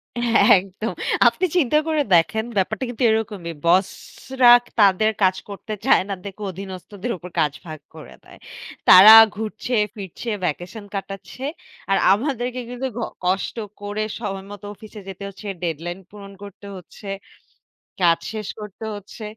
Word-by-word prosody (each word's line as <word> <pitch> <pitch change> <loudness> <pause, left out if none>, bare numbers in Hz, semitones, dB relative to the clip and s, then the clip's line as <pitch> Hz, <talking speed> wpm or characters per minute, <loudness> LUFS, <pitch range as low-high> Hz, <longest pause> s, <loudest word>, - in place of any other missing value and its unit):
এ - - -3 0.4
একদম। 195 +4 -5 0.3
আপনি 375 - +1
চিন্তা 300 -2 +3
করে 310 -2 +1
দেখেন 170 +7 +2
ব্যাপারটা 215 +6 -1
কিন্তু 245 +1 -4
এরকমই। 205 -6 -3
বসরা 200 +8 +1 0.3
তাদের 205 +1 +4
কাজ 185 0 +4
করতে 205 +2 -7
চায় 270 - +5
না - - -1
দেখে 200 +1 -9
অধীনস্থদের 190 +4 -7
উপর 180 +1 -10
কাজ 150 -3 +1
ভাগ 155 -2 -8 0.2
করে 155 - -12
দেয়। - - -16 0.5
তারা 195 +4 +10 0.2
ঘুরছে 220 +3 -5 0.2
ফিরছে, 200 +3 -7
ভ্যাকেশন 180 +6 -4
কাটাচ্ছে। 195 +5 -7 0.5
আর 195 - +4 0.2
আমাদেরকে 250 +2 -2
কিন্তু 250 +2 -4
ক - - -3 0.3
কষ্ট 185 +2 -1 0.3
করে 205 +1 -3 0.2
সময় 195 -3 -5
মতো 205 0 -10
অফিসে 215 +1 -12
যেতে 195 +1 -9
হচ্ছে। 200 +2 -11 0.2
ডেডলাইন 170 +2 -4
পূরণ 200 -1 -12
করতে 200 0 -11
হচ্ছে। 185 +3 -13 0.9
কাজ 170 -2 +3
শেষ 215 -2 -5
করতে 210 +1 -9
হচ্ছে। 205 +2 -11
200 Hz, 140 wpm, -21 LUFS, 185-220 Hz, 0.9 s, তারা